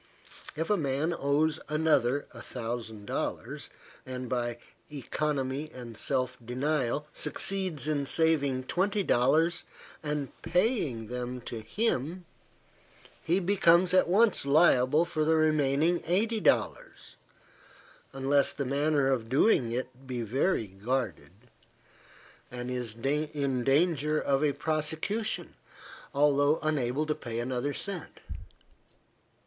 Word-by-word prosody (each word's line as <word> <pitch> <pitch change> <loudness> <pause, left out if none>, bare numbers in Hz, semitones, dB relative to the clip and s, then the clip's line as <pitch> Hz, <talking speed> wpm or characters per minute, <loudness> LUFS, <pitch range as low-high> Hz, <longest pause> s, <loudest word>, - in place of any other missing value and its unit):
If 160 +5 -2
a 210 - +4
man 145 +2 0
owes 150 +2 +1
another 145 -4 +2
a - - -10
hundred 115 -3 -6
dollars, - - -4 0.3
and, 130 0 -6
by 120 -1 -2 0.3
economy 145 0 -2
and 120 -4 -9
self 130 +2 -1
denial, 135 +2 -1
succeeds 160 -1 -2
in 145 -3 0
saving 140 -5 +2
twenty 195 +8 0
dollars 160 +6 +2 0.4
and 150 -2 -2
paying 175 - 0
them 125 +2 -5
to 115 -1 -6
him, 175 - -1 1.0
he 175 +4 +2
becomes 180 -1 +4
at 185 - +5
once 210 +5 +3
liable 145 0 +4
for 155 -2 -1
the 160 +1 +3
remaining 155 +1 +2
eighty 215 +6 +1
dollars, - - 0 1.0
unless 135 +1 +2
the 140 - -3
manner 140 +1 +1
of 115 -4 -1
doing 135 - +3
it 130 +2 -5
be 125 -2 -3
very 130 - 0
guarded, 110 +3 -3 1.2
and 125 0 -5
is 120 -4 -3
in 140 0 -1
danger 150 +2 +2
of 140 +1 +1
a 145 -2 +2
prosecution, 160 +9 -1 0.6
although 145 +1 +3
unable 145 -2 0
to 155 - 0
pay 115 -5 -6
another 125 +3 -2
cent. 195 -5 -4
145 Hz, 115 wpm, -29 LUFS, 125-160 Hz, 1.2 s, at